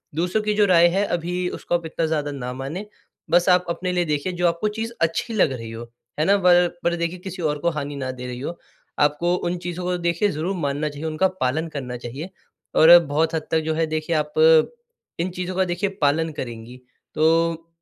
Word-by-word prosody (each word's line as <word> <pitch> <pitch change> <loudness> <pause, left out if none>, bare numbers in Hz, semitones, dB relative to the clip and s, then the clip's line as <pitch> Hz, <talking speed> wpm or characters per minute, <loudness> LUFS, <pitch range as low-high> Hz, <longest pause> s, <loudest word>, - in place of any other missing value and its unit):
दूसरों 180 +6 0
की 210 0 0
जो 210 0 +4
राय 175 -3 +6
है 200 - +2
अभी 180 0 -2
उसको 175 - -3
आप 170 -1 -2
इतना 160 +1 -2
ज़्यादा 150 -2 -1
ना 125 -3 -5
मानें 140 +10 -5 0.5
बस 175 +2 +4
आप 180 0 +4
अपने 180 +2 -2
लिए 175 -1 +1
देखिए 150 +3 -1
जो 175 0 +1
आपको 170 +5 0
चीज़ 225 +1 -3
अच्छी 165 +8 0
लग 205 -9 +3
रही 115 -3 -7
हो। 115 +1 -7 0.4
है 155 - +2
ना? 200 +3 +4
पर 180 -2 +5 0.2
पर 170 0 +1
देखिए 170 +1 -3
किसी 185 0 -7
और 150 -2 0
को 170 - +1
हानि 145 -2 -4
न 130 -1 -3
दे 125 - -7
रही 125 0 -6
हो, 170 +6 -6 0.4
आपको 150 +4 +2
उन 175 0 -2
चीज़ों 175 +1 -4
को 180 0 0
देखिए 170 +4 +1
ज़रूर 165 +5 -2
मानना 145 -1 -1
चाहिए, 145 +2 -7
उनका 160 +4 +2
पालन 140 +6 0
करना 130 -5 -5
चाहिए। 130 +9 -7 0.5
और 170 +2 +9
बहुत 160 +3 0
हद 155 - -3
तक 160 - +3
जो 160 - 0
है 165 0 +1
देखिए 155 +1 -2
आप 150 -1 -1 0.9
इन 175 +2 0
चीज़ों 180 +1 -4
का 190 - +3
देखिए 175 +2 -1
पालन 155 +3 +2
करेंगी 120 -2 -7 0.4
तो 165 +1 +2
165 Hz, 215 wpm, -23 LUFS, 150-180 Hz, 0.9 s, और